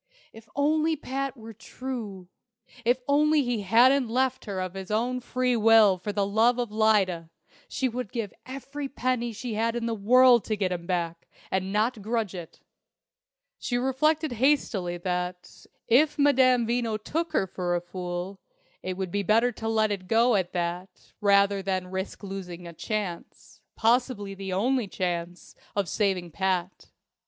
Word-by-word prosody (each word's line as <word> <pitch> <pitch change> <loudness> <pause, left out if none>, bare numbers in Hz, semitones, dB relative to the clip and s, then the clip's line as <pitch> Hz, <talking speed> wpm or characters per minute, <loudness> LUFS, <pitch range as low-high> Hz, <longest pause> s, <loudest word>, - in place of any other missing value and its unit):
If 225 0 -15
only 310 +2 +2
Pat 275 -1 -4
were 225 0 -10
true 220 -4 -7 0.6
if 245 +2 +1
only 300 +1 +3
he 240 -4 -1
hadn't 240 +5 +4
left 260 +2 0
her 200 -3 -4
of 185 -1 -3
his 190 -1 -7
own 240 +4 0
free 250 0 0
will 220 -4 +5
for 205 +3 -4
love 215 +4 +2
of 240 -3 -2
Lyda, 200 -6 +2 0.4
she 265 - -1
would 245 -3 -5
give 220 -6 -4
every 275 +2 -6
penny 250 -3 -1
she 230 +2 -5
had 225 +2 0
in 235 -1 -2
the 230 - -1
world 240 +2 +5
to 215 - -1
get 190 -3 -1
him 170 -1 -4
back, 170 -2 -2 0.2
and 190 0 -1
not 215 +2 0
grudge 220 -2 -2
it! 175 -3 -9 1.0
She 245 - -1
reflected 300 +4 +1
hastily 230 -8 +1
that, 180 0 -4 0.2
if 290 +6 +4
Madame 260 -4 +4
Veno 230 -2 0
took 325 +10 -3
her - - +2
for 180 -1 -2
a - - +1
fool, 180 +1 -5 0.4
it 185 0 -4
would 190 -2 -3
be 205 - 0
better 225 +4 +3
to 225 -1 -6
let 220 -1 +2
it 190 -2 -4
go 230 +4 +4
at 190 -4 0
that 180 +1 -4
rather 200 -1 +4
than 185 -1 -2
risk 190 +2 -5
losing 180 -3 -7
a 170 - -8
chance 195 -1 -5
possibly 230 -3 +1
the 195 -1 -6
only 235 +5 +1
chance 175 -2 -4 0.2
of 200 -3 0
saving 185 -2 -1
Pat. 185 +1 -2
215 Hz, 160 wpm, -27 LUFS, 185-250 Hz, 1.0 s, will